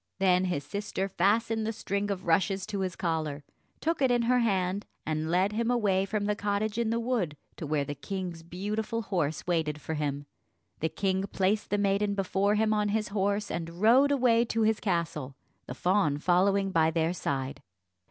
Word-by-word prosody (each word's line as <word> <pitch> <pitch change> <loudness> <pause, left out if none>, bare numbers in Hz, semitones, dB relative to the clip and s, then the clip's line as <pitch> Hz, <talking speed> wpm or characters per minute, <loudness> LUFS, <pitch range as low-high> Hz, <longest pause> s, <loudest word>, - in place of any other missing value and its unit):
Then 185 -1 +3
his 175 -6 -1
sister 195 +4 -3
fastened 220 +4 +1
the 220 - -1
string 205 -2 -2
of 195 -2 -3
rushes 190 +3 +2
to 210 -2 -4
his 185 -2 -2
collar, 155 -4 -2 0.4
took 330 -1 0
it 265 - +4
in 240 -1 +2
her 250 +2 +3
hand, 195 -3 0 0.2
and 155 0 -2
led 185 +4 +2
him 230 +2 -1
away 200 -6 +2
from 205 +1 -2
the 210 0 +1
cottage 205 +2 -1
in 230 -2 +1
the 230 +1 0
wood 230 - -1 0.2
to 155 - -5
where 145 -1 0
the 145 - -4
king's 175 +4 -5
beautiful 210 +6 -3
horse 160 -7 -1
waited 160 -4 0
for 160 - -5
him. 145 -2 -2 0.5
The 160 - 0
king 190 +1 -1
placed 200 +2 0
the 205 - +1
maiden 200 0 +1
before 195 +1 +1
him 215 0 +2
on 210 -1 +1
his 215 +1 -1
horse 200 +1 0
and 165 +1 -5
rode 255 +7 +5
away 245 -4 +4
to 225 -1 0
his 220 0 +2
castle, 160 -8 -2 0.3
the 125 - -6
fawn 175 -3 +2
following 195 +4 +2
by 160 -2 +3
their 165 +1 0
side. 135 -5 -3
195 Hz, 190 wpm, -29 LUFS, 165-215 Hz, 0.5 s, rode